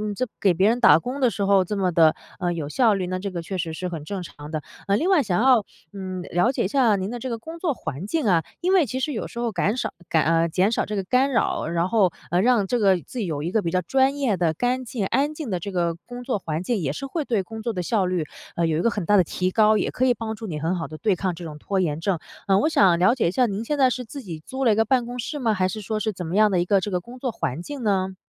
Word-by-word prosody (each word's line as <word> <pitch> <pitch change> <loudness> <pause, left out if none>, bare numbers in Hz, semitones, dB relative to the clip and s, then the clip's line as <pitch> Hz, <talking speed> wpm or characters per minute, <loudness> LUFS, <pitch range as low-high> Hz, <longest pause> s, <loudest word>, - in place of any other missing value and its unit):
这 255 +5 -1
给 195 -3 +4
别 190 +4 +3
人 235 +2 +1
打 240 - +8
工 255 +3 -5
的 255 - +4
时 205 -3 -2
候 195 -1 +4
这 205 +3 -4
么 185 -2 +1
地， 160 -2 +5 0.3
呃， 175 -2 0
有 165 -4 -3
效 225 - +3
率， 190 -2 -2
那 185 0 -2
这 200 +2 -4
个 175 -2 -4
确 190 +3 -4
实 165 -2 -3
是 180 +3 -4
很 165 -4 -6
正 190 +3 -5
常 150 -3 -10
的。 155 -2 -2 0.3
呃， 200 - +3
另 335 - 0
外 370 -6 +5
想 200 -7 0
要， 250 -4 +5 0.3
嗯， 185 -2 -5
了 175 +7 +1
解 270 - -1
一 - - +1
下 235 -1 +3
您 190 0 -3
的 245 - -5
这 260 - -4
个 230 - -2
工 325 +8 -9
作 330 -4 0
环 165 - -6
境 315 +3 -1
啊， 170 -4 +3 0.2
因 365 +2 +1
为 365 -5 +5
其 260 - -3
实 295 +3 -1
有 225 - -3
时 - - -13
候 235 -1 -1
感 205 +5 0
少 - - -2 0.2
感， 155 -3 +2
呃 165 +1 +2
减 190 +6 +2
少 - - +1
这 210 - -4
个 195 - -1
干 255 +8 +2
扰， 235 - 0
然 170 +2 0
后， 200 -5 +3 0.2
呃， 175 +1 +3
让 235 -2 +3
这 245 +5 0
个 195 -3 +4
自 250 - -8
己 205 - -1
有 150 -3 -3
一 170 - -2
个 220 - +2
比 170 - -2
较 180 +2 +1
专 265 +8 +2
业 260 -8 +1
的 170 -3 +1
干 250 +6 0
净、 230 -4 -3
安 275 +9 +1
静 295 -8 -5
的 180 - -1
这 200 +4 -6
个 170 -2 0
工 245 +8 -10
作 245 -5 -1
环 160 -1 -3
境， 230 +2 0
也 145 -6 -1
是 155 - -5
会 305 +4 -3
对 225 -8 0
工 220 +3 -8
作 235 - -2
的 180 -4 -3
效 195 0 +1
率， 180 -3 -1 0.3
呃， 170 - +1
有 160 -1 0
一 - - +1
个 235 - +3
很 205 -6 -3
大 205 - +4
的 190 - +6
提 185 +2 -2
高， 215 +1 +4
也 - - -1
可 255 - 0
以 250 - +4
帮 220 -1 -4
助 220 0 -7
你 155 -5 -4
很 165 +4 0
好 165 -5 -4
地 155 - -9
对 205 +3 +1
抗 185 -1 -2
这 170 +1 -8
种 150 -2 -8
拖 195 +5 -1
延 160 -4 0
症。 185 +1 0 0.3
呃， 195 -1 +4
我 205 - +3
想 190 - +4
了 185 +6 +4
解 250 - +1
一 - - +1
下 250 +6 +3
您 205 -1 -3
现 295 +5 -2
在 260 -2 +4
是 250 - -3
自 275 +4 -8
己 165 -5 -7
租 265 +6 -3
了 230 - +5
一 - - 0
个 220 - +4
办 245 +1 +2
公 245 +1 -6
室 290 +5 -4
吗？ 230 -5 +1
还 185 -2 +1
是 215 +2 -5
说 215 +1 -3
是 215 +1 -1
怎 180 -3 -6
么 165 +3 -3
样 215 0 +5
的 185 - +1
一 175 - +1
个 195 +1 +3
这 205 - -3
个 180 - 0
工 240 +7 -12
作 255 -1 -2
环 145 - -3
境 275 +7 -7
呢？ 190 -3 0
200 Hz, 340 characters per minute, -24 LUFS, 175-245 Hz, 0.3 s, 打